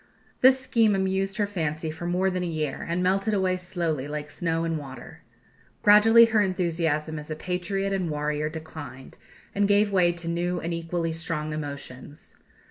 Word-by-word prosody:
This 260 +1 +6
scheme 230 -5 +2
amused 190 0 0
her 210 - +2
fancy 160 -5 -3
for 165 +2 -6
more 185 +2 +1
than 185 0 -2
a 180 - -2
year, 155 -4 -3
and 175 +2 0
melted 195 +3 +1
away 185 -2 +1
slowly, 170 -6 -3
like 150 0 -5
snow 165 0 -1
in 165 -1 -1
water. 135 -4 -10 0.6
Gradually 225 +3 +8
her 225 -2 +2
enthusiasm 165 -5 -1
as 150 +1 -8
patriot 190 +3 -2
and 185 -3 -1
warrior 150 0 -1
declined, 155 -4 -9 0.3
and 200 0 +2
gave 205 0 +3
way 180 -3 +4
to 170 -1 -7
new 175 +1 -1
and 170 +1 -3
equally 165 0 -2
strong 160 -2 -3
emotions. 145 -2 -8
170 Hz, 165 wpm, -26 LUFS, 155-195 Hz, 0.6 s, Gradually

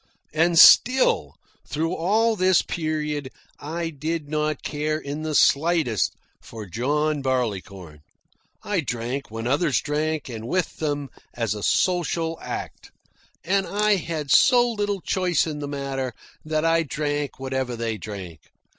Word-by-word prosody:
And 165 +2 +2
still, 255 +9 +6 0.3
through 165 +3 -1
all 220 +7 +2
this 185 -2 +3
period, 150 -4 -3 0.3
I 165 +3 -4
did 155 +1 -4
not 150 -1 -1
care 155 +1 -2
in 145 0 -6
the 155 -1 -3
slightest 150 - +2 0.3
for 110 -2 -9
John 145 - -1
Barleycorn. 100 - -3 0.6
I 205 -3 -1
drank 125 -1 -3
when 115 +1 -6
others 145 +2 +2
drank, 155 0 -2
and 115 -2 -7
with 180 +4 -1
them, 145 -3 -2 0.3
as 115 -4 -1
a 105 - -6
social 165 - 0
act. - - -6 0.5
And 195 +2 +1
I 210 0 +2
had 155 -5 -4
so 245 - +6
little 205 -3 -2
choice 180 -4 +1
in 155 -2 -4
the 145 - -4
matter 135 -3 -4 0.3
that 155 0 -1
I 165 0 +3
drank 145 -2 -3
whatever 130 -2 -2
they 115 -2 -3
drank. 95 -6 -8
150 Hz, 135 wpm, -24 LUFS, 130-165 Hz, 0.6 s, still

